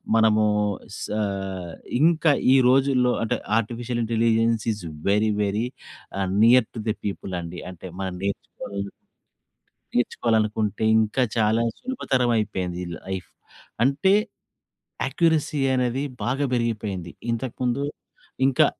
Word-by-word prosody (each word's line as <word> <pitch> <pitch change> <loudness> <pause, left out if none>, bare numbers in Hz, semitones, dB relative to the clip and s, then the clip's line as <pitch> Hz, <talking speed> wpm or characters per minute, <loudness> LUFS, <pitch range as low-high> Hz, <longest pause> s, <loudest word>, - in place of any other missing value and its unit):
మనమూ 110 -1 +4 0.5
సా 105 - -3 0.8
ఇంకా 160 0 +4 0.2
ఈ - - +7
రోజుల్లో 130 -1 +4
అంటే 115 - 0 0.2
artificial 120 +2 -2
intelligence 115 0 +2
is 105 -3 -9 0.3
very, 105 +2 +3
very 105 +3 0 0.5
ఆహ్, 95 -1 0
నియర్ 120 0 +6
టు 110 - -4
ది 110 - +1
పీపుల్ 100 -1 -4
అండి. 85 +1 -7
అంటే 90 +1 -9
మనం 95 -1 -3
నేర్చుకో... 100 0 -4 1.3
నేర్చుకోవాలనుకుంటే 110 -3 +1 0.2
ఇంకా 110 +4 +1 0.2
చాలా 110 +1 +3 0.2
సులభతరమైపోయింది 115 - 0
ఈ - - -7
లైఫ్. 95 -3 -6 0.5
అంటే, 140 +9 +3 0.9
యాక్యురసీ 160 -3 +1 0.2
అనేది 125 +1 0 0.2
బాగా 135 +4 0
పెరిగిపోయింది. 105 -7 -2 0.2
ఇంతకుముందు 125 +2 -1 0.6
ఇంకా 135 - +4
115 Hz, 105 wpm, -24 LUFS, 105-125 Hz, 1.3 s, ఈ